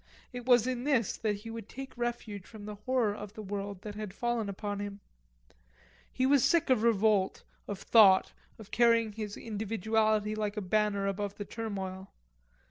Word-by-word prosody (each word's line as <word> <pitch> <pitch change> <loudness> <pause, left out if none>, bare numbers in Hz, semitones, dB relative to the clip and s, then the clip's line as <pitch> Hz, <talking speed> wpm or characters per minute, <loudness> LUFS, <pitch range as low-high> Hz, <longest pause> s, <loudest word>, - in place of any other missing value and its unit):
It 245 0 -7
was 245 -3 +6
in 250 -1 -2
this 260 -7 +1
that 215 -2 0
he 225 - -5
would 225 -2 -8
take 270 0 -8
refuge 235 -5 -4
from 215 -2 -11
the 210 - -5
horror 220 +1 0
of 205 -1 -8
the 215 - -7
world 200 -1 -5
that 210 - -6
had 210 -2 -6
fallen 240 -3 -1
upon 205 +1 -4
him. 205 0 -5 1.1
He 255 - 0
was 275 -2 +4
sick 335 -5 +3
of 255 - +4
revolt, 215 -3 +2 0.2
of 205 - -4
thought, 200 -5 +6 0.2
of 215 -2 -13
carrying 230 -2 +4
his 210 -1 -6
individuality 215 0 0
like 215 0 -2
a - - +1
banner 205 +1 +1
above 200 0 -2
the 205 - -6
turmoil. 195 -4 -5
215 Hz, 175 wpm, -31 LUFS, 205-230 Hz, 1.1 s, was